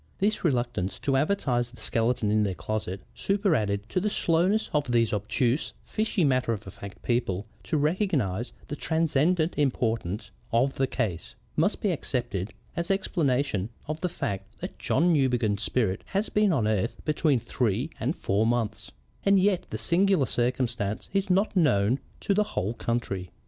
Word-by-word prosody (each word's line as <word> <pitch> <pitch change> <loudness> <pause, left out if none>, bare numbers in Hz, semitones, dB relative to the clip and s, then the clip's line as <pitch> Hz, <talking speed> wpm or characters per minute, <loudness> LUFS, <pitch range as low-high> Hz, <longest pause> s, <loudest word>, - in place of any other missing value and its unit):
This 210 +2 0
reluctance 120 - 0
to 135 - +1
advertise 135 -6 +1
the 120 - -16
skeleton 115 -2 +1
in 110 0 +3
their 100 -3 0
closet, 95 +2 -3
superadded 130 - +1
to 185 - +1
the 210 - 0
slowness 185 +4 +2
of 145 -4 +1
these 115 -2 +3
obtuse, 120 +6 0
fishy, 215 -4 0
matter 130 -4 +2
of 105 -1 -5
fact 100 0 -10
people 110 -5 0 0.2
to 160 - 0
recognize 145 - 0 0.2
the 145 - -4
transcendent 160 +2 +1
importance 115 -7 0 0.2
of 125 +4 +3
the 135 - +1
case, 105 - -3 0.2
must - - +1
be - - +2
accepted 110 -6 -2 0.2
as 170 0 -2
explanation 140 - +1 0.2
of 155 +1 -4
the 180 - 0
fact 100 - -4
that - - -7
John 175 +1 +3
Newbegin's 125 -8 +2
spirit 105 -4 0
has 200 +3 -1
been 210 -2 +3
on 125 -10 +2
earth 110 +2 0
between 150 -3 +2
three 120 - -1
and 130 +8 0
four 105 +3 +1
months, 110 -4 -1 0.3
and 200 -1 +5
yet 190 -1 +2
the 110 - -3
singular 170 - +3
circumstance 120 -3 -1
is 195 0 +1
not 195 +3 +2
known 125 - +3 0.2
to 200 - +1
the 210 +2 +3
whole 100 +5 0
country. 105 -7 -2
125 Hz, 160 wpm, -27 LUFS, 110-165 Hz, 0.3 s, and